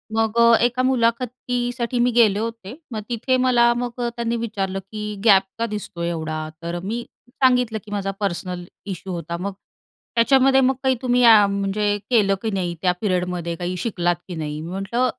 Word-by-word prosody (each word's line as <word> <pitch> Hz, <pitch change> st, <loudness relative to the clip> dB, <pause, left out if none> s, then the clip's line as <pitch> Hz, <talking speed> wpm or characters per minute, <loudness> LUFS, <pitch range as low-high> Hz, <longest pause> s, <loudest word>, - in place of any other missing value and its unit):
मग 225 Hz, 0 st, 0 dB
अ, 235 Hz, 0 st, +7 dB
एका 250 Hz, +1 st, 0 dB
मुलाखतीसाठी 245 Hz, 0 st, 0 dB
मी 250 Hz, -, +2 dB
गेले 220 Hz, -4 st, +4 dB
होते. 230 Hz, -1 st, -5 dB, 0.2 s
मग 215 Hz, -1 st, -3 dB
तिथे 255 Hz, +2 st, 0 dB
मला 240 Hz, -2 st, +4 dB
मग 245 Hz, 0 st, -4 dB
अ, 240 Hz, -, 0 dB
त्यांनी 235 Hz, 0 st, -1 dB
विचारलं 200 Hz, -4 st, -3 dB
की 210 Hz, -1 st, -5 dB
"गॅप 195 Hz, -3 st, +7 dB, 0.2 s
का 230 Hz, -, +1 dB
दिसतो 185 Hz, -4 st, -6 dB
एवढा?" 160 Hz, -2 st, -3 dB
तर 170 Hz, +1 st, -4 dB
मी 230 Hz, +4 st, -3 dB, 0.2 s
सांगितलं 250 Hz, -4 st, +2 dB
की 205 Hz, -, -12 dB
माझा 195 Hz, -1 st, -2 dB
पर्सनल 180 Hz, -2 st, -3 dB, 0.3 s
इश्यू 185 Hz, 0 st, -7 dB
होता. 170 Hz, 0 st, -4 dB
मग, 200 Hz, +1 st, -3 dB, 0.6 s
"त्याच्यामध्ये 265 Hz, +3 st, +5 dB
मग 265 Hz, +1 st, +3 dB
काही 260 Hz, -1 st, +3 dB
तुम्ही 250 Hz, -1 st, +2 dB
अ, 220 Hz, -3 st, +8 dB
म्हणजे 200 Hz, +1 st, 0 dB
केलं 205 Hz, -5 st, +3 dB
की 225 Hz, -, -1 dB
नाही? 180 Hz, -3 st, -2 dB
त्या 180 Hz, -1 st, +3 dB
पिरियडमध्ये 180 Hz, -3 st, -1 dB
काही 180 Hz, +1 st, -4 dB
शिकलात 175 Hz, -6 st, 0 dB
की 175 Hz, -, -6 dB
नाही?" 150 Hz, -1 st, -4 dB
मी 165 Hz, -, -7 dB
म्हटलं 235 Hz, +7 st, 0 dB
215 Hz, 180 wpm, -22 LUFS, 185-240 Hz, 0.6 s, अ